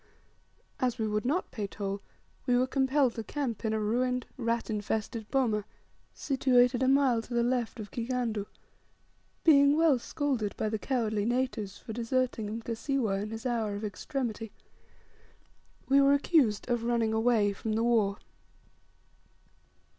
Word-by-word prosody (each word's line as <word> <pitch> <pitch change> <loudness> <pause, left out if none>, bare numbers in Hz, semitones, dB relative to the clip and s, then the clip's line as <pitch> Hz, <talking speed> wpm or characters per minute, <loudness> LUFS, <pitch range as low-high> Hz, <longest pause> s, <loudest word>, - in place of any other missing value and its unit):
As 250 -2 0
we 220 -2 -1
would 210 +2 -1
not 310 +9 0
pay 210 -4 -3
toll, 200 0 -4 0.5
we 245 -1 +4
were 250 - +3
compelled 265 -1 +2
to 225 - -5
camp 245 -2 -3
in 220 - 0
a 220 - 0
ruined, 250 +3 0
rat 235 -2 -1
infested 220 +1 -3
boma, 230 -6 +1 0.5
situated 255 -3 +2
a 260 - +3
mile 265 -4 +4
to 240 +1 -7
the 235 - +3
left 245 -1 -1
of 210 -2 -7
Kigandu, 235 -4 -2 1.0
being 285 -2 +6
well 320 -6 +4
scolded 255 -6 -2
by 215 - -1
the 220 0 -2
cowardly 220 -6 -1
natives 235 -4 -1
for 220 - -8
deserting 240 -1 -1
Mkasiwa 225 -1 -2
in 210 - -4
his 225 +2 -7
hour 225 -4 -1
of 205 +2 -4
extremity. 225 +1 -4 1.4
We 275 +1 +5
were 275 0 +5
accused 280 -7 +2
of 240 -2 0
running 230 -2 +1
away 220 -2 +2
from 215 +2 -3
the 225 +1 +1
war. 215 -4 +2
235 Hz, 145 wpm, -29 LUFS, 215-255 Hz, 1.4 s, being